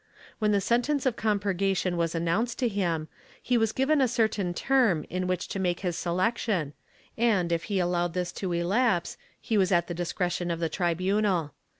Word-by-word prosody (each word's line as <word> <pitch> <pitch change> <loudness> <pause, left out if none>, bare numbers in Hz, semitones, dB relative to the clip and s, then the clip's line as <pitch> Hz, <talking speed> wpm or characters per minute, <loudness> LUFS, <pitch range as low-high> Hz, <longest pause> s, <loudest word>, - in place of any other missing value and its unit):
When 215 -1 +2
the 200 -1 +2
sentence 250 +7 +1
of 255 -3 +2
compurgation 195 -4 0
was 170 -1 -1
announced 170 +9 0
to 250 - +1
him, 175 -7 -1 0.3
he 250 - 0
was 225 -2 +2
given 275 +5 +2
a 260 - +4
certain 220 -6 0
term 215 - +2
in 185 0 -2
which 185 -1 -1
to 195 - -3
make 175 -2 -1
his 180 -3 -2
selection 185 -3 -1 0.5
and, 205 -8 +2
if 170 0 0
he 200 - -1
allowed 175 -1 0
this 180 -1 -1
to 185 -1 -4
elapse, 175 +2 +1 0.2
he 220 -3 0
was 190 -1 +2
at 175 -2 +3
the 175 - -5
discretion 175 0 -2
of 170 -1 -2
the 165 -1 -1
tribunal. 180 -2 0
185 Hz, 185 wpm, -27 LUFS, 175-220 Hz, 0.5 s, a